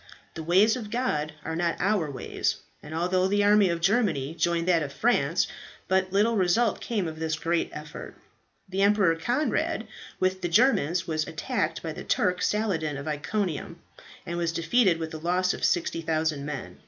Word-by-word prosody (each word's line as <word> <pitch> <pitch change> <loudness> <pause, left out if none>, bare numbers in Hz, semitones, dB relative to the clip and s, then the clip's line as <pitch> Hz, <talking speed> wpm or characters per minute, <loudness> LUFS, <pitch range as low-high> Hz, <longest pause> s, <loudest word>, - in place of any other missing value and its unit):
The 160 - -6
ways 190 +7 +4
of 225 -5 -6
God 160 -11 -1
are 160 - -3
not 170 0 0
our 190 -5 +1
ways, 135 - -2 0.3
and 150 +1 -8
although 185 +2 +1
the 205 +1 +2
army 205 -1 +5
of 170 -1 -2
Germany 170 - +1
joined 170 +1 0
that 170 -3 +4
of 140 -2 -4
France, 165 -4 +2 0.4
but 190 0 +1
little 210 +4 +3
results 200 +4 +2
came 205 -7 -2
of 160 0 -7
this 160 -1 -1
great 170 +1 0
effort. 150 0 -9 0.5
The 190 +1 -2
Emperor 200 -4 +4
Conrad, 245 - -1 0.3
with 185 0 0
the 175 - -1
Germans, 185 - +3
was 155 -2 -1
attacked 165 -1 -2
by 160 -2 -4
the - - -8
Turk 180 0 +1
Saladin 165 -9 0
of 140 +2 -7
Iconium, 170 +2 -3 0.5
and 170 +1 -3
was 170 -1 0
defeated 170 +3 +2
with 160 -1 -5
a 155 - -5
loss 180 +3 +1
of - - -7
60,000 160 -3 0
men. 145 -3 -6
175 Hz, 175 wpm, -27 LUFS, 160-200 Hz, 0.5 s, army